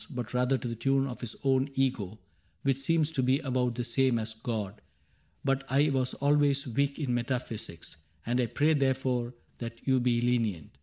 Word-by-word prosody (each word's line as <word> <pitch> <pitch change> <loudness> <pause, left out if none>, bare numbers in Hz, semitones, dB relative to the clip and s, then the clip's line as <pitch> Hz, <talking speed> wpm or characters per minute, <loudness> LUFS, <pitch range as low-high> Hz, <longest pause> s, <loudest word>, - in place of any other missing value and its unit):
But 125 -5 -5
rather 125 +2 +2
to 125 - -5
the 115 - -3
tune 135 +4 +2
of 125 -3 -6
his 120 -3 -5
own 135 0 +2
Ego, 115 -7 0 0.5
Which 135 -1 +1
seems 160 +2 +2
to 135 - 0
be 130 +1 +3
about 125 -4 0
the 120 - -2
same 125 +1 +2
as 110 0 -3
God. 110 -2 -4 0.6
But 135 -1 +1
I 140 +3 +3
was 130 -1 0
always 145 0 +3
weak 140 +3 0
in 140 -6 -1
metaphysics. 120 -10 -3 0.3
And 125 +2 +1
I 120 - +1
pray 150 +6 +2
therefore 130 -3 0 0.2
that 115 -1 -7
you 130 -1 +3
be 120 -1 +2
lenient. 115 - -1
125 Hz, 185 wpm, -29 LUFS, 120-135 Hz, 0.6 s, be